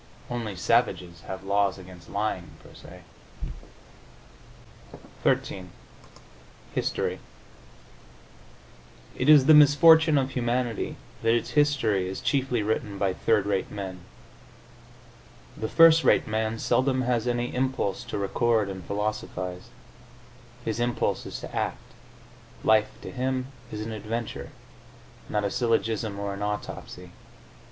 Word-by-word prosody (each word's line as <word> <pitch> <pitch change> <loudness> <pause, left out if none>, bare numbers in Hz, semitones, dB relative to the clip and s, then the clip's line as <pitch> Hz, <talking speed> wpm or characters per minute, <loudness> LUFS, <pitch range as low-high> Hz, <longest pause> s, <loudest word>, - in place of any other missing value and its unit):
Only 115 -5 -3
savages 90 -4 0
have 95 0 -6
laws 100 0 +1
against 90 -2 -13
lying 100 -3 -3
per - - -15
se. - - -13 2.2
XIII 90 -2 0 1.0
HISTORY - - -1 2.0
It 130 - 0
is 145 -4 +8
the 155 - +7
misfortune 155 +1 +7
of 135 -1 0
humanity 120 -2 -1 0.3
that 115 +1 +3
its 120 - -2
history 115 -11 +2
is 95 - -5
chiefly 130 -2 0
written 105 -1 -2
by 95 -2 0
third 105 +1 +1
rate 100 -2 -1
men. 95 -3 -6 1.6
The 110 - -4
first 165 0 +7
rate - - +4
man 110 +1 -1
seldom 130 +3 +1
has 120 -1 0
any 120 0 -1
impulse 130 -6 -1
to - - -4
record 110 +1 +1
and 95 -2 -7
philosophise; 100 -1 -4 1.0
his 110 0 -2
impulse 120 0 -1
is - - -6
to - - -8
act; - - -1 0.9
life, 110 -1 +4
to - - -7
him, 130 0 -2 0.2
is 105 - -5
an 110 +1 -5
adventure, 110 +1 -5 0.8
not 105 -1 0
a 100 - -1
syllogism 110 -3 0
or 100 0 -3
an 100 - -7
autopsy. 105 0 -5
110 Hz, 120 wpm, -26 LUFS, 100-125 Hz, 2.2 s, is